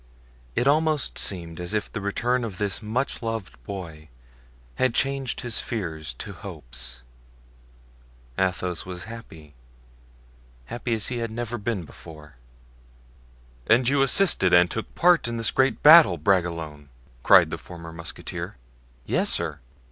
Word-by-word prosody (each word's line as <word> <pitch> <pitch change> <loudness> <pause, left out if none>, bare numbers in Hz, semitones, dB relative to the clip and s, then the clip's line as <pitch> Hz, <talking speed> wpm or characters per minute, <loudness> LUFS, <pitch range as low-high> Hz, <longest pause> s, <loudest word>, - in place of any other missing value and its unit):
It - - +1
almost 155 0 +1
seemed 85 -3 -1
as 90 +4 -2
if 105 - -2
the 105 - -4
return 120 +5 0
of 105 -5 -5
this 100 0 0
much 120 +6 -2
loved 115 - -5
boy 80 -4 -8 0.7
had 130 -2 +1
changed 135 -1 0
his 120 -3 -1
fears 80 - -4
to - - -7
hopes. - - -6 1.3
Athos 90 -1 -1
was 90 -1 -6
happy—happy - - -11
as 110 - 0
he 125 -1 -3
had 115 0 -2
never 120 +1 -4
been 105 -3 -2
before. 75 -3 -13 1.3
"And 120 +2 +4
you 140 +1 +3
assisted 135 - +4
and 90 0 +5
took 110 - -4
part 175 -5 +4
in 120 0 -3
this 115 - 0
great 130 0 +1
battle, 160 +2 +9
Bragelonne!" 85 -7 -1 0.3
cried - - +6
the - - -4
former 85 -2 -10
musketeer. 85 -6 -6 0.5
"Yes, - - +1
sir." - - -1
95 Hz, 135 wpm, -25 LUFS, 80-120 Hz, 1.3 s, battle